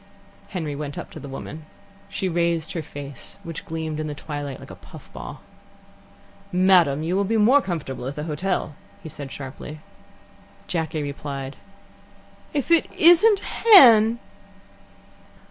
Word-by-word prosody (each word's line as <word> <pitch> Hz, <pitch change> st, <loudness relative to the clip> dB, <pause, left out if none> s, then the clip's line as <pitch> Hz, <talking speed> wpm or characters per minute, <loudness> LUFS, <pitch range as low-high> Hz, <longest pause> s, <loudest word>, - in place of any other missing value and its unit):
Henry 160 Hz, -6 st, -4 dB
went 145 Hz, -1 st, -6 dB
up -, -, -7 dB
to -, -, -9 dB
the 140 Hz, -, -9 dB
woman. 155 Hz, +3 st, -8 dB, 0.4 s
She 195 Hz, -, -2 dB
raised 170 Hz, -2 st, 0 dB
her 165 Hz, -, -2 dB
face, 145 Hz, -3 st, -9 dB
which 165 Hz, -3 st, -7 dB
gleamed 160 Hz, -1 st, -4 dB
in 155 Hz, -, -3 dB
the 150 Hz, -, -5 dB
twilight 145 Hz, -2 st, -6 dB
like -, -, -11 dB
a -, -, -9 dB
puff -, -, -15 dB
ball. -, -, -8 dB, 1.1 s
"Madam, 180 Hz, -6 st, +4 dB
you 170 Hz, +3 st, -1 dB
will 200 Hz, -, +2 dB
be 225 Hz, +3 st, 0 dB
more 245 Hz, +7 st, +5 dB
comfortable 150 Hz, -, -4 dB
at 140 Hz, -, -5 dB
the 150 Hz, -, -4 dB
hotel," 165 Hz, +1 st, -2 dB, 0.3 s
he 160 Hz, -, -7 dB
said 140 Hz, -2 st, -9 dB
sharply. 145 Hz, +2 st, -8 dB, 0.9 s
Jacky 160 Hz, -3 st, -2 dB
replied: 140 Hz, -1 st, -5 dB, 1.0 s
"If 290 Hz, +2 st, -2 dB
it 335 Hz, -2 st, +4 dB
isn't 360 Hz, +5 st, +6 dB
Hen!" 235 Hz, -, +7 dB
160 Hz, 145 wpm, -23 LUFS, 145-195 Hz, 1.1 s, Hen